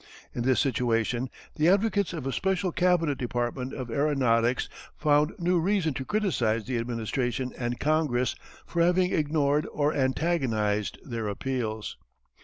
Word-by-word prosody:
In 120 Hz, -, -3 dB
this 125 Hz, -2 st, +2 dB
situation 120 Hz, -1 st, 0 dB, 0.3 s
the 155 Hz, +3 st, +4 dB
advocates 200 Hz, 0 st, +2 dB
of 160 Hz, -6 st, -5 dB
a 135 Hz, -, -1 dB
special 190 Hz, -1 st, 0 dB
cabinet 170 Hz, -5 st, +2 dB
department 125 Hz, +1 st, -2 dB
of 125 Hz, -3 st, -5 dB
aeronautics 125 Hz, -4 st, +2 dB, 0.3 s
found 150 Hz, +1 st, +3 dB
new 180 Hz, 0 st, +2 dB
reason 180 Hz, -3 st, +1 dB
to 130 Hz, -, -4 dB
criticize 125 Hz, -, 0 dB
the 125 Hz, -2 st, -1 dB
Administration 120 Hz, +2 st, -2 dB
and 120 Hz, -1 st, -3 dB
Congress 145 Hz, -5 st, +1 dB, 0.3 s
for 170 Hz, -, -1 dB
having 180 Hz, +2 st, +3 dB
ignored 150 Hz, -1 st, +1 dB
or 150 Hz, 0 st, +1 dB
antagonized 130 Hz, -, 0 dB
their 115 Hz, -5 st, -3 dB
appeals. 110 Hz, 0 st, -3 dB
135 Hz, 135 wpm, -27 LUFS, 120-165 Hz, 0.3 s, the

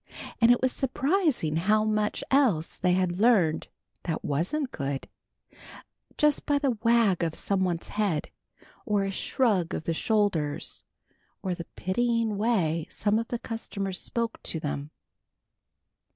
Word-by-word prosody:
And 230 Hz, -, +6 dB
it 245 Hz, +1 st, +4 dB
was 260 Hz, -, +3 dB
surprising 270 Hz, -, +1 dB
how 210 Hz, +5 st, +3 dB
much 215 Hz, -1 st, 0 dB
else 240 Hz, -, +2 dB
they 180 Hz, -1 st, +3 dB
had 180 Hz, -1 st, 0 dB
learned 205 Hz, -9 st, +3 dB, 0.3 s
that 160 Hz, -3 st, -3 dB
wasn't 220 Hz, -, -1 dB
good, 140 Hz, -2 st, -3 dB, 1.1 s
just 300 Hz, -1 st, +2 dB
by 290 Hz, -1 st, +3 dB
the 280 Hz, -2 st, +1 dB
wag 230 Hz, -6 st, +3 dB
of 165 Hz, -2 st, -1 dB
somebody's 185 Hz, -4 st, -1 dB
head, 200 Hz, -8 st, -1 dB, 0.5 s
or 210 Hz, -5 st, +1 dB
a 195 Hz, -, -1 dB
shrug 195 Hz, -4 st, +1 dB
of -, -, -4 dB
the 165 Hz, -, -1 dB
shoulders 180 Hz, -7 st, 0 dB, 0.6 s
or 185 Hz, -, -1 dB
the 170 Hz, -1 st, -6 dB
pitying 230 Hz, +2 st, 0 dB
way 170 Hz, -8 st, +1 dB
some 210 Hz, +1 st, +1 dB
of 230 Hz, -, -3 dB
the 240 Hz, -, -2 dB
customers 200 Hz, -5 st, -4 dB
spoke 230 Hz, -1 st, -3 dB
to 160 Hz, -, -3 dB
them. 145 Hz, -1 st, -4 dB
205 Hz, 135 wpm, -27 LUFS, 170-235 Hz, 1.1 s, And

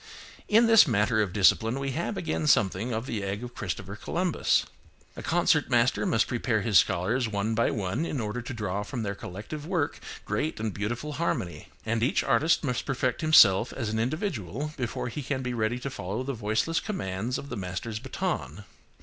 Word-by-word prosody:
In 225 Hz, +2 st, +5 dB
this 225 Hz, -6 st, +7 dB
matter 110 Hz, -1 st, +2 dB
of 100 Hz, -4 st, -1 dB
discipline 110 Hz, +5 st, +3 dB
we 135 Hz, 0 st, -2 dB
have 170 Hz, +8 st, -3 dB
again 155 Hz, -2 st, -2 dB
something 110 Hz, -3 st, +2 dB
of 115 Hz, +1 st, -2 dB
the 115 Hz, -6 st, -3 dB
egg 100 Hz, +3 st, -3 dB
of 120 Hz, 0 st, -7 dB
Christopher 95 Hz, 0 st, -5 dB
Columbus. 175 Hz, +9 st, 0 dB, 0.5 s
A -, -, -7 dB
concert -, -, +2 dB
master -, -, +2 dB
must -, -, +3 dB
prepare -, -, 0 dB
his -, -, +5 dB
scholars 115 Hz, +8 st, +1 dB
one 105 Hz, +1 st, -1 dB
by 115 Hz, +1 st, +2 dB
one 105 Hz, -, -2 dB
in 155 Hz, -5 st, -3 dB
order 110 Hz, +2 st, -3 dB
to 120 Hz, -, -7 dB
draw 100 Hz, -3 st, -2 dB
from 115 Hz, +3 st, -4 dB
their 100 Hz, -1 st, -2 dB
collective 110 Hz, -, -7 dB
work 170 Hz, -6 st, -1 dB, 0.3 s
great 155 Hz, -5 st, -2 dB
and 110 Hz, -2 st, -2 dB
beautiful 120 Hz, +8 st, -3 dB
harmony; 90 Hz, -, -2 dB, 0.2 s
and 115 Hz, 0 st, 0 dB
each 125 Hz, -, +2 dB
artist 160 Hz, +3 st, +2 dB
must 125 Hz, -5 st, -2 dB
perfect 130 Hz, -1 st, -1 dB
himself 120 Hz, -9 st, +6 dB
as 115 Hz, -5 st, -3 dB
an 110 Hz, +1 st, -1 dB
individual 140 Hz, -, -3 dB
before 120 Hz, -2 st, -3 dB
he 145 Hz, +5 st, -5 dB
can 130 Hz, -1 st, -3 dB
be 125 Hz, 0 st, -2 dB
ready 115 Hz, +1 st, 0 dB
to 135 Hz, +2 st, -5 dB
follow 105 Hz, +2 st, -4 dB
the 140 Hz, +1 st, -3 dB
voiceless 115 Hz, +9 st, 0 dB
commands 115 Hz, -, -3 dB
of 140 Hz, -, -8 dB
the 120 Hz, -, -4 dB
master's 100 Hz, +3 st, -4 dB
baton. 75 Hz, +2 st, -4 dB
115 Hz, 190 wpm, -27 LUFS, 105-140 Hz, 0.5 s, this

